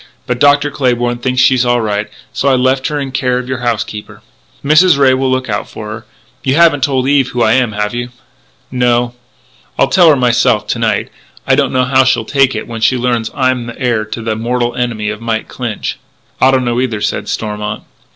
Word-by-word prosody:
But 125 -1 -2
Dr. 145 +1 +3
Claybourn 120 -3 0
thinks 125 +1 +1
she's 130 -2 +4
all 120 0 +2
right.... 105 -1 -2 0.2
So 140 - 0
I 135 - +4
left 130 +1 +1
her 150 -1 -2
in 135 -2 -4
care 130 -1 0
of 125 0 -4
your 130 -1 -3
housekeeper." 110 -3 -4 0.4
"Mrs. 155 +2 +5
Ray 135 -2 +4
will 130 0 0
look 130 0 -1
out 105 -2 -3
for 105 -1 -8
her.... 110 +1 -8 0.4
You 135 +1 +1
haven't 160 -4 +4
told 130 -1 +1
Eve 140 -2 +3
who 120 -1 0
I 110 - +3
am, 125 -4 +1
have 105 +1 -2
you?" 120 0 -4 0.6
"No." 120 -1 +1 0.6
"I'll - - +2
tell 175 -3 +5
her 150 - +5
myself 120 -4 +2
to 115 - -1
night. 110 -3 -1 0.3
I 135 - +2
don't 135 -1 +2
know 130 0 +1
how 130 +1 +4
she'll 120 -3 +1
take 135 -1 +2
it 110 - -5
when 115 -1 -7
she 130 +3 +3
learns 120 -2 -1
I'm 130 -3 0
the 115 - -8
heir 120 -4 0
to 110 +1 -6
the 110 -1 -2
mortal 120 +2 -1
enemy 115 -4 -2
of 110 +1 -8
Mike 115 -1 -2
Clinch." 120 -4 -5 0.4
"I 130 - +6
don't 130 -1 +2
know 120 +1 0
either," 120 -5 -2
said - - -2
Stormont. 105 -1 -4
125 Hz, 215 wpm, -14 LUFS, 115-130 Hz, 0.6 s, I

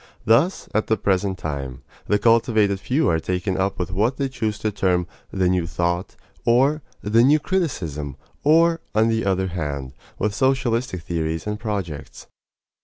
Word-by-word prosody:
Thus, 135 - +3
at 110 - +1
the 110 - +2
present 95 -1 0
time, 70 -6 -5 0.2
the 105 - +3
cultivated 110 -3 +3
few 135 +9 +1
are 80 - +2
taken 90 +3 -2
up 95 +1 0
with 90 0 -3
what 110 +8 +1
they 135 -1 -1
choose 110 -5 -2
to 110 0 -1
term 90 -3 +1 0.2
the 95 -2 0
"new 90 -2 +1
thought," 85 +3 -2 0.3
or 135 +6 +3 0.2
the 110 +3 +4
"new 140 +5 +6
criticism," 85 - -2 0.3
or, 165 +2 +4
on 110 +1 +4
the 110 0 +1
other 95 -1 0
hand, 70 -6 -4 0.2
with 105 0 0
socialistic 120 -5 0
theories 80 -1 -2
and 105 0 -3
projects. 95 - -5
100 Hz, 160 wpm, -22 LUFS, 90-115 Hz, 0.3 s, new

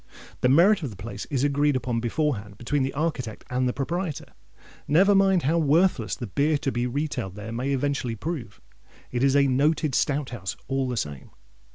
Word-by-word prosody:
The 125 - +2
merit 180 +9 +5
of 145 - -3
the 105 - -10
place 95 +5 -7
is 135 -3 -1
agreed 145 0 +2
upon 120 -2 -1
beforehand 115 -4 -2
between 140 +4 -1
the 135 +1 0
architect 140 -7 -3
and 125 0 +1
the - - +1
proprietor. 165 +4 -4 0.5
Never 190 +7 +5
mind 195 -2 +4
how 165 +5 +2
worthless 150 - +2
the 120 - -5
beer 145 - +1
to 135 -1 -2
be 120 0 -1
retailed 125 -7 -3
there 105 +2 -7
may 125 +4 -2
eventually 135 -3 -1
prove, 120 -3 -5 0.5
it 125 +1 -1
is 135 0 +3
a 140 -1 +5
Noted 145 +3 +2
Stout 145 +1 0
House 95 -6 -5
all 135 -1 0
the 125 - -3
same! 75 - -4
135 Hz, 190 wpm, -25 LUFS, 120-150 Hz, 0.5 s, merit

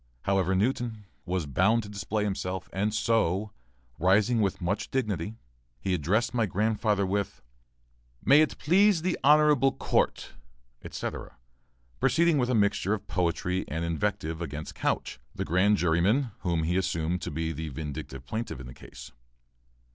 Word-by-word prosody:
However, 95 -1 +1
Newton 110 0 -1 0.2
was 90 -2 -1
bound 100 - +2
to 100 - -9
display 105 +1 -2
himself, 95 -2 -3
and 105 +3 0
so, 110 -2 +1 0.5
rising 105 +6 +3
with 100 -3 0
much 95 +3 -2
dignity, 105 -6 -2 0.4
he 95 +4 -1
addressed 90 - +1
my 115 -3 +1
grandfather 105 +1 +1
with, 100 +1 -2 0.8
"May 140 +3 +7
it 155 - 0
please 190 +1 +3
the 180 0 0
honorable 150 -2 +5
court," - - 0 0.5
etc., 65 - -6 0.6
proceeding 170 -3 +3
with 125 -1 +1
a 125 - +2
mixture 100 -1 +2
of 105 -1 -10
poetry 90 0 -1
and 80 +2 -3
invective 85 -1 -2
against 75 -2 -5
Couch, - - -2 0.2
the - - -3
grand 95 +5 +3
juryman 95 +10 +2
whom 85 -3 0
he 85 +3 0
assumed 85 -1 -1
to - - -4
be 80 +2 -2
the 80 0 -5
vindictive 70 -2 -6
plaintiff 110 - -4
in 65 - -8
this 60 +1 -11
case. - - -12
100 Hz, 145 wpm, -28 LUFS, 85-110 Hz, 0.8 s, May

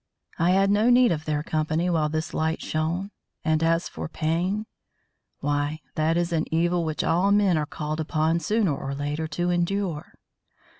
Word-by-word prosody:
I 170 +2 +3
had 195 +2 +4
no 210 +4 +3
need 245 -1 +5
of 160 -1 -2
their 150 -1 -1
company 155 +2 0
while 160 -4 +1
this 155 +1 -3
light 160 +1 0
shone; 170 +6 -2 0.3
and 155 0 +2
as 165 +1 +2
for - - -6
pain 175 +7 -1 0.8
why, 145 +2 -1
that 160 +2 +1
is 175 0 0
an 160 0 -1
evil 170 +2 +1
which 155 -1 -2
all 180 +4 +2
men 200 -3 +4
are 150 -1 0
called 155 +1 -4
upon 160 +1 +1
sooner 195 -2 +1
or 135 0 -5
later 145 +3 -3
to 175 +3 -1
endure. 175 -2 -1
165 Hz, 170 wpm, -25 LUFS, 155-180 Hz, 0.8 s, need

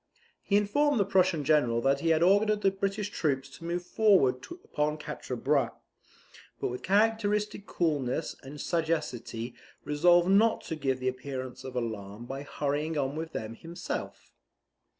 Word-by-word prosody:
He 200 - +2
informed 255 +7 +2
the 200 - +3
Prussian 185 -5 +2
general 140 -6 +3
that 135 +2 +2
he 165 - 0
had 160 0 +4
ordered 205 +3 +4
the 195 - +4
British 195 +1 -2
troops 135 -7 -1
to 140 +4 -13
move 175 +1 -2
forward 185 -13 +3 0.2
upon 150 +1 -1
Quatre 140 -4 -6
Bras; 130 -1 +1 0.9
but - - -1
with 125 +1 -5
characteristic 210 0 +1
coolness 150 -3 -1
and 145 +2 -10
sagacity 130 -9 -2 0.3
resolved 175 +4 +4
not 220 +3 +4
to 160 - -5
give 135 -4 -1
the 130 - -2
appearance 130 0 -4
of 130 -1 -7
alarm 110 -2 -4
by 135 +2 -5
hurrying 150 +2 -2
on 140 0 -1
with 160 +1 -4
them 110 +1 -4
himself. 165 +8 -6
150 Hz, 150 wpm, -29 LUFS, 130-195 Hz, 0.9 s, had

